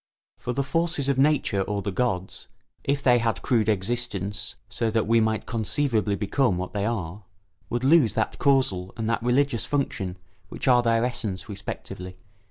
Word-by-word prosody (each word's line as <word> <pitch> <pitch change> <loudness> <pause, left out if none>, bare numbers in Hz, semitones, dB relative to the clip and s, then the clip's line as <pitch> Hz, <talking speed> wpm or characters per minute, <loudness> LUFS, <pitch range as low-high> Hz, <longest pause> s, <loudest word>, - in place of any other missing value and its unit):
For 125 - -3
the 140 +3 0
forces 165 -1 0
of 135 -1 +1
Nature 140 -8 +2
or 100 +1 -2
the 100 - -2
gods, 95 -3 -2 0.4
if 140 0 0
they 120 -2 +5
had 115 -1 -1
crude 110 -4 +2
existence, 105 -1 -2
so 115 - -1
that 110 0 +1
we 115 +1 +4
might 110 -1 0
conceivably 110 -2 0
become 105 +1 +1
what 95 +1 -4
they 105 0 -1
are, 100 -4 -3 0.5
would 120 +1 -2
lose 135 - +5
that 110 - -1
causal 115 -10 +2
and 110 -1 -2
that 115 0 0
religious 125 -1 +1
function 105 -10 -2 0.3
which - - -5
are 125 -2 +6
their 115 0 +2
essence 110 -6 -3
respectively. 95 -2 -7
115 Hz, 170 wpm, -25 LUFS, 100-130 Hz, 0.5 s, are